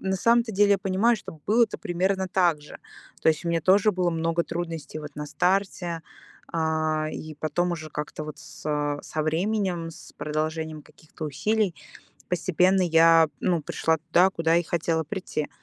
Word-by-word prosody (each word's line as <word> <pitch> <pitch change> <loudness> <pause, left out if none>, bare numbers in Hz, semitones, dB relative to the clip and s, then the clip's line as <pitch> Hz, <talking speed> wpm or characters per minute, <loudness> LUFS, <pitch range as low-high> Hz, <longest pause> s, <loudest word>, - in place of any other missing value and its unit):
на 190 0 -1
самом-то 230 +3 +3
деле 205 +1 +4
я 200 - +3
понимаю, 195 +5 +2
что 165 -5 -10
было-то 225 +1 +3
примерно 190 +2 -1
так 175 -5 +2
же. 150 - -11 0.4
То - - +4
есть 160 +2 -3
у - - -1
меня 165 -1 +1
тоже 200 +4 +5
было 180 -2 +1
много 165 +1 0
трудностей 165 -3 -5
вот 150 -1 -9
на 150 - -4
старте, 180 -1 0 0.5
а, 155 -1 0
и 155 -1 -7
потом 175 +3 -1
уже 155 -2 -5
как-то 150 +1 -5
вот 150 -1 -7
с - - -13 0.4
со 155 - -3
временем, 175 +1 -1
с - - -13
продолжением 155 +1 -3
каких-то 155 0 -11
усилий, 200 +6 0 0.6
постепенно 185 +2 +2
я, 165 -1 +6
ну 175 -3 +1
пришла 160 +2 0
туда, 170 +4 +3
куда 165 -2 +1
и 175 - +1
хотела 165 -1 0
прийти. 160 -3 -4
170 Hz, 165 wpm, -26 LUFS, 155-190 Hz, 0.6 s, я